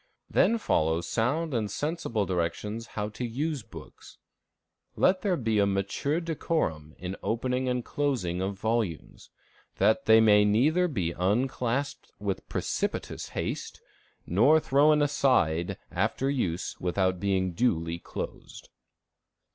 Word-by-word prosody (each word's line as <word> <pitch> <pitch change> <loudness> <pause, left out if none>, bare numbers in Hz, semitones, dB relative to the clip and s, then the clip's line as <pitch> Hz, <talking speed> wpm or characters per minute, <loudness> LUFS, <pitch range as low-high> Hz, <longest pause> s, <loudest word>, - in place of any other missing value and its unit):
Then 230 - +4
follow 80 - +1
sound 130 - -1
and 110 -4 -1
sensible 120 - -2
directions 105 +6 -2
how 105 0 -1
to 110 - -7
use 140 +5 -2
books. - - -13 0.8
"Let 185 0 +3
there 185 -3 +1
be 115 -4 0
a 100 - +4
mature 100 - -1
decorum 150 - -2
in 90 +2 -5
opening 125 +3 -1
and 125 -1 -1
closing 120 -12 -1
of 95 +1 -2
volumes, 110 -6 -2 0.5
that 110 +8 +2
they 110 0 +8
may 105 -2 +6
neither 145 +13 +3
be 95 - -2
unclasped 120 +8 -1
with 100 -2 -4
precipitous - - -3
haste, - - -4 0.5
nor 125 - +5
thrown 150 +1 +4
aside 125 - +1
after 135 +1 0
use 90 -11 -2
without 95 0 0
being 95 -1 0
duly 85 -5 0
closed." - - -8
110 Hz, 125 wpm, -28 LUFS, 95-140 Hz, 0.8 s, they